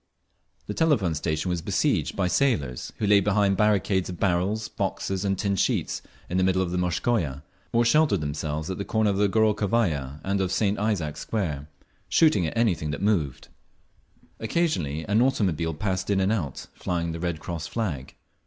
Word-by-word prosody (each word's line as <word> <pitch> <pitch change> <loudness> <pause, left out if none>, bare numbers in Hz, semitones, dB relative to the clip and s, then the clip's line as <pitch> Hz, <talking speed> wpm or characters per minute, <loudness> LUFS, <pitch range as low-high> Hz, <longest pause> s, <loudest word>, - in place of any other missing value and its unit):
The 105 - -4
Telephone 120 - +2
Station 80 +3 -1
was 90 -1 -1
besieged - - 0
by 90 -2 +1
sailors, 90 - 0
who 110 - -1
lay 100 0 +6
behind 100 0 +2
barricades 100 -3 +2
of 90 - -7
barrels, 100 +4 +1
boxes 95 0 -2
and 95 -1 0
tin 100 0 0
sheets - - 0 0.3
in 90 +2 -1
the - - +3
middle 95 0 +2
of 85 - -3
the 90 - -1
Morskaya, 85 - 0 0.3
or 120 0 +3
sheltered 150 - +4
themselves 75 +2 -3
at 95 - -5
the - - -1
corner 110 0 +1
of 95 - -1
the 100 0 +3
Gorokhovaya 105 - +1
and 100 0 0
of 95 -1 -1
St. 100 +1 +1
Isaac's 100 -9 -1
Square, 75 -10 -3 0.4
shooting 105 - +4
at 75 - -5
anything 90 -10 +1
that 75 +5 -4
moved. 85 -11 0 0.9
Occasionally 110 - -1
an 105 +3 +2
automobile 85 - +1
passed 95 +2 -2
in 100 -1 +2
and 95 +2 +2
out, 85 - -2
flying 85 -1 -2
the 85 - -5
Red 85 -2 -2
Cross 85 -2 -5
flag. 80 - -4
95 Hz, 175 wpm, -26 LUFS, 80-105 Hz, 0.9 s, lay